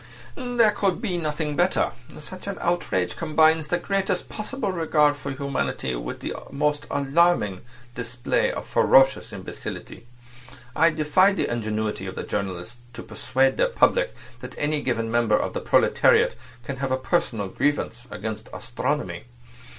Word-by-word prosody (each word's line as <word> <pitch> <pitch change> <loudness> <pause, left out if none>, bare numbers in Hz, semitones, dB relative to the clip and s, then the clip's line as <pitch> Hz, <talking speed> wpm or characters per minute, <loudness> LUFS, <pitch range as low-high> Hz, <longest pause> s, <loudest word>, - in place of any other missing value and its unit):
"There 245 -4 +2
could 195 -3 0
be 185 -6 -2
nothing 150 -1 -2
better. 175 +3 +2 0.3
Such 185 +6 -10
an 200 - -3
outrage 130 - 0
combines 160 -1 +3
the 175 - +1
greatest 195 +1 -1
possible 215 0 -3
regard 155 -4 +2
for 145 0 -7
humanity 135 - -2
with - - -5
the - - -3 0.2
most 150 +1 -1
alarming 140 - +2 0.3
display 120 0 -1
of - - -5
ferocious 135 0 +4
imbecility. 120 - -8 0.7
I 165 +2 +5
defy 160 +5 +3
the - - 0
ingenuity 110 -4 -2
of 95 - -6
journalists 95 +1 -4 0.2
to 115 - -7
persuade 130 +5 0
their - - +3
public - - +2 0.2
that - - -9
any 150 0 0
given 115 -4 -1
member 115 -2 +3
of - - -2
the - - -3
proletariat - - +4 0.3
can 135 +3 -5
have 135 0 -2
a 130 - +2
personal 130 - -1
grievance 120 +1 -1
against 110 0 -6
astronomy. 145 +5 -3
145 Hz, 145 wpm, -24 LUFS, 115-175 Hz, 0.7 s, I